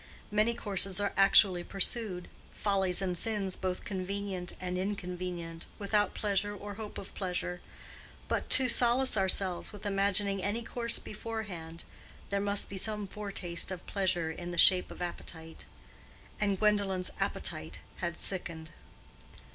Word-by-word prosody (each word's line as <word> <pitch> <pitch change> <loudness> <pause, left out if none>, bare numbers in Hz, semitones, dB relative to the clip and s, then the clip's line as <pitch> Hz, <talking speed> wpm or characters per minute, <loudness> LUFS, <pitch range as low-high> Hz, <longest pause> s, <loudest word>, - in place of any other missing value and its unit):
Many 215 +3 +3
courses 195 -3 -1
are 200 -1 0
actually 195 -2 +6
pursued—follies 195 -1 -1
and 180 -2 -1
sins 195 -1 0
both 185 -1 -3
convenient 190 -1 -3
and 180 0 -3
inconvenient—without 180 +1 -2
pleasure 205 0 0
or 205 +1 -7
hope 210 0 -7
of 195 - -8
pleasure; 180 -2 -3 0.7
but - - -1
to 260 -1 +8
solace 245 +1 +5
ourselves 190 -2 0
with 210 -1 -10
imagining 195 0 +1
any 205 +5 -1
course 235 0 0
beforehand, 195 -7 -6 0.5
there 200 0 0
must 200 0 +2
be 195 - -6
some 210 0 -2
foretaste 195 -4 -1
of 185 -2 -5
pleasure 175 -5 0
in 175 +2 -6
the 175 - -5
shape 185 +1 +6
of - - -6
appetite; 165 -2 -6 0.7
and 200 -2 +1
Gwendolen's 200 -3 +2
appetite 80 +1 -2 0.2
had 170 -1 -3
sickened. 170 -4 -4
195 Hz, 130 wpm, -31 LUFS, 180-205 Hz, 0.7 s, to